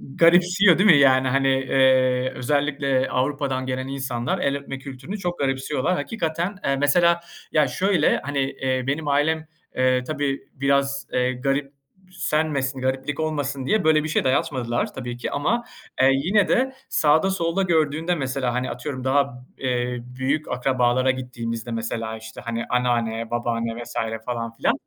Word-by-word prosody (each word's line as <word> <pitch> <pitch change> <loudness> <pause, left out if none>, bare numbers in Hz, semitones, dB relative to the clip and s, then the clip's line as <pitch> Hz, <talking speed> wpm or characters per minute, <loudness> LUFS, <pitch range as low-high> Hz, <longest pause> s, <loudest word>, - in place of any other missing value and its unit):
garipsiyor, 175 +2 +5
değil 200 +3 +4
mi 155 - +8
yani? 130 -2 +5
Hani, 135 +1 +2
eee, 130 -1 +3
özellikle 140 -1 0
Avrupa'dan 135 0 -1
gelen 130 0 -3
insanlar 130 -3 -2
el 140 0 0
öpme 135 -1 -7
kültürünü 135 +9 -7
çok 175 -2 -4
garipsiyorlar. 135 +4 0
Hakikaten, 170 +2 -2
eee, 135 - +2
mesela, 170 +5 +3 0.3
ya 150 -3 +3
şöyle 190 +8 +2
hani, 145 0 -2
eee, 130 -1 -1
benim 150 +2 -1
ailem 155 +3 +1 0.6
tabii 145 -3 -2
biraz, 140 0 0
eee, 125 0 +1
garipsenmesin, 140 +1 -2
gariplik 135 +3 -2
olmasın 145 -4 -2
diye 215 -2 +2
böyle 155 -1 +4
bir 155 - -3
şey - - +1
dayatmadılar 130 -2 0
tabii 120 -2 -6
ki. - - -4
Ama, 225 +12 0 0.4
eee, 130 - +6
yine 185 +10 +2
de 265 +1 +1 0.2
sağda 160 +5 +3
solda 175 0 0
gördüğünde 165 -1 +1
mesela, 130 -4 -2
hani 125 +1 -1
atıyorum 130 0 -5
daha, 130 -2 0
eee, 125 -1 -1 0.2
büyük 145 +4 0
akrabalara 125 0 +2
gittiğimizde 120 -2 -5
mesela 115 0 -3
işte, 110 0 -10
hani 115 0 -3
anneanne, 115 -2 0
babaanne 115 0 -2
vs. - - -11 0.3
falan 115 -2 -3
filan - - +1
135 Hz, 145 wpm, -23 LUFS, 125-155 Hz, 0.6 s, mi